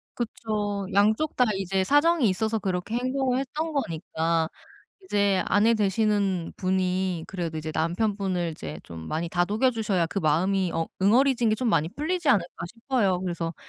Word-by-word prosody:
그쵸. 210 -4 -3
양쪽 215 +9 +2
다 250 - +4
이제 190 0 0
사정이 290 - +3
있어서 220 +4 0
그렇게 190 +3 -2
행동을 255 +1 0
했던 305 +4 -3
거니까 165 - -1 0.6
이제 200 - +2
아내 215 +3 +4
되시는 200 -3 0
분이 185 -2 0
그래도 170 -4 -4
이제 155 0 -4
남편분을 180 +1 0
이제 80 - -7
좀 80 -1 -9
많이 165 +2 -2
다독여 210 +8 +2
주셔야 205 -7 0
그 195 - -3
마음이 185 +4 +1
어 165 - 0 0.2
'응어리진 240 +2 +4
게 215 - +3
좀 245 +1 -1
많이 160 -5 +2
풀리지 315 - -2
않을까.' 175 -7 +1
싶어요. 225 -3 0
그래서 170 -2 -3
195 Hz, 340 characters per minute, -26 LUFS, 175-230 Hz, 0.6 s, 다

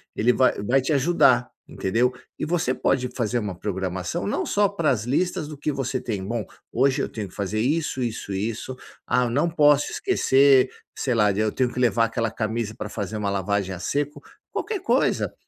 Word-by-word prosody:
ele 120 +3 +3
vai 130 +1 +3
vai 125 +6 +2
te 135 +4 0
ajudar, 130 -4 +3 0.2
entendeu? 120 +6 0 0.2
E - - -2
você 160 -5 0
pode 125 -1 0
fazer 120 0 0
uma 100 -5 -4
programação, 95 - -3
não - - -1
só 205 -1 +2
para 170 -7 +1
as 110 -5 0
listas 170 +4 0
do 150 -1 -8
que 150 +2 -1
você 135 -1 -2
tem: 105 -5 -4
"Bom, 115 +2 -3 0.3
hoje 135 +3 +2
eu - - -2
tenho 105 -3 -5
que - - -19
fazer 100 +2 -2
isso, 145 +2 0
isso 110 -3 -4
e 100 +4 -1
isso. 125 +3 -6 0.3
Ah, 125 -1 +2
não 145 +8 +1
posso 145 -3 +4
esquecer 135 - +4 0.3
sei 125 -3 -1
lá, 105 -2 +4
de 100 - -3
eu 110 0 +1
tenho 125 +1 0
que - - -4
levar 115 -2 +3
aquela 115 -1 -1
camisa 110 +1 -3
pra 105 - -4
fazer 100 +1 -4
uma 105 -1 -1
lavagem 100 0 -1
a 90 - -7
seco", 145 - -2 0.3
qualquer 430 -3 -3
coisa. - - +1
125 Hz, 200 wpm, -24 LUFS, 105-140 Hz, 0.3 s, posso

